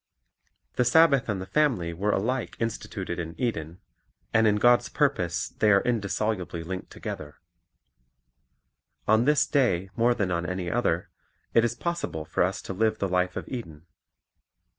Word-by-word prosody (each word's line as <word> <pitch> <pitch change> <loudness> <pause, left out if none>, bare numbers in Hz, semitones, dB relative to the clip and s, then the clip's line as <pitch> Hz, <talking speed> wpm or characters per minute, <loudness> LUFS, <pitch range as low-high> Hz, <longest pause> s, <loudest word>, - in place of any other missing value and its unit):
The 125 - +4
Sabbath 140 -1 +4
and 100 -3 -1
the 95 - -5
family 105 - +1
were 100 +5 -1
alike 120 +5 -1
instituted 100 -5 -4
in 80 -1 -4
The - - -23
Family 125 - 0
Eden, 85 -5 -5 0.5
and 110 0 +5
in 105 - +4
God's 120 +3 +4
purpose 135 - 0
they 110 - +1
are 100 -1 +4
indissolubly 105 -6 -1
linked 95 +2 -6
together. 75 0 -7 1.7
On 110 +2 +4
this 150 +1 +4
day 95 -9 +1
more 120 +1 +3
than 95 -5 -1
on 85 -1 0
any 90 -1 -3
other, 110 -8 0 0.4
it 115 - +5
is 120 0 0
possible 170 - -3
for - - -2
us - - 0
to - - -5
live 110 +2 +1
the 100 - -1
life 90 0 0
of - - -5
Eden. 85 - -7
105 Hz, 160 wpm, -27 LUFS, 90-120 Hz, 1.7 s, and